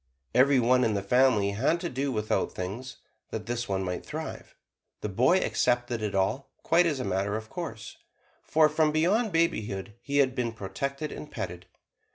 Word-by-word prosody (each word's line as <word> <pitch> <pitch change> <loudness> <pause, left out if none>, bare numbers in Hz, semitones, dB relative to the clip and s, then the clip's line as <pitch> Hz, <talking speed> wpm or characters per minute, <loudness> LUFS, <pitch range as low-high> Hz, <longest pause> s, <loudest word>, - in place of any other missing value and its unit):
Every 135 +1 +5
one 125 +1 +4
in 110 -3 +1
the 100 - -1
family 115 -2 +3
had 130 +11 +1
to - - -2
do 135 +2 -2
without 110 -3 -1
things, 105 +8 -5 0.3
that 110 -1 -5
this 120 0 -3
one 95 -1 0
might 90 -1 -3
thrive. - - -7 0.5
The 105 - -3
boy 125 - +4
accepted 120 -8 0
it 105 -2 -2
all, 100 +8 0
quite 170 +1 +4
as 145 -5 -1
a - - -2
matter 100 +3 0
of 110 0 -9
course, 115 - -6 0.4
for 155 0 +4
from 155 0 +2
babyhood 165 - +1
he 140 0 -2
had 135 -2 +4
been 120 -3 -2
protected 140 +9 -4
and 150 - -8
petted. 90 +1 -6
120 Hz, 175 wpm, -28 LUFS, 105-140 Hz, 0.5 s, Every